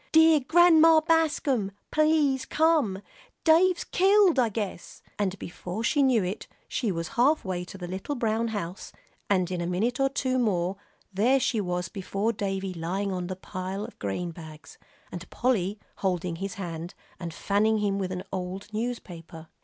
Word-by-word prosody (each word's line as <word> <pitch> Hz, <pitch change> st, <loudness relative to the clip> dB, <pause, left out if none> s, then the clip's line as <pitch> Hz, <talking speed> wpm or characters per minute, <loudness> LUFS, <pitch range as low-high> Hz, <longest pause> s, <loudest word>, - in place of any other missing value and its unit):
"Dear 320 Hz, -1 st, +6 dB
Grandma 325 Hz, +2 st, +6 dB
Bascom, 300 Hz, -10 st, +1 dB, 0.2 s
please 305 Hz, -4 st, +2 dB
come; 295 Hz, -12 st, +2 dB, 0.4 s
Dave's 345 Hz, +2 st, +4 dB
killed, 385 Hz, -4 st, +4 dB
I 240 Hz, -3 st, +3 dB
guess," 205 Hz, -4 st, -6 dB, 0.2 s
and 200 Hz, -2 st, -1 dB
before 180 Hz, +4 st, -6 dB
she 290 Hz, +4 st, +2 dB
knew 255 Hz, -6 st, +3 dB
it, 185 Hz, +4 st, -4 dB, 0.2 s
she 230 Hz, -7 st, -1 dB
was 165 Hz, -2 st, -4 dB
halfway 235 Hz, -, +1 dB
to 195 Hz, -, -10 dB
the 180 Hz, -2 st, -6 dB
little 190 Hz, +11 st, -4 dB
brown 230 Hz, -1 st, 0 dB
house, 200 Hz, -4 st, -5 dB, 0.4 s
and 185 Hz, -3 st, +1 dB
in 180 Hz, -1 st, -2 dB
a 170 Hz, -, -2 dB
minute 220 Hz, +9 st, -1 dB
or 270 Hz, 0 st, +3 dB
two 260 Hz, -1 st, -1 dB
more 190 Hz, -5 st, 0 dB, 0.4 s
there 240 Hz, +8 st, +3 dB
she 230 Hz, -3 st, 0 dB
was 180 Hz, -1 st, -2 dB
before 200 Hz, +3 st, -2 dB
Davie 195 Hz, -2 st, -3 dB
lying 185 Hz, +4 st, -2 dB
on 180 Hz, -1 st, -3 dB
the 185 Hz, -, -4 dB
pile 185 Hz, +2 st, -5 dB
of 235 Hz, -, -13 dB
grain 135 Hz, -, -3 dB
bags, 155 Hz, -2 st, -12 dB, 0.3 s
and 180 Hz, 0 st, -8 dB
Polly 215 Hz, -5 st, 0 dB, 0.2 s
holding 180 Hz, -3 st, -1 dB
his 195 Hz, +2 st, -5 dB
hand, 170 Hz, -2 st, -6 dB, 0.2 s
and 170 Hz, -1 st, -5 dB
fanning 210 Hz, +6 st, +1 dB
him 200 Hz, -1 st, 0 dB
with 185 Hz, -1 st, -2 dB
an 185 Hz, 0 st, -4 dB
old 190 Hz, +3 st, -5 dB
newspaper. 175 Hz, -8 st, -6 dB
200 Hz, 160 wpm, -27 LUFS, 180-260 Hz, 0.4 s, Dear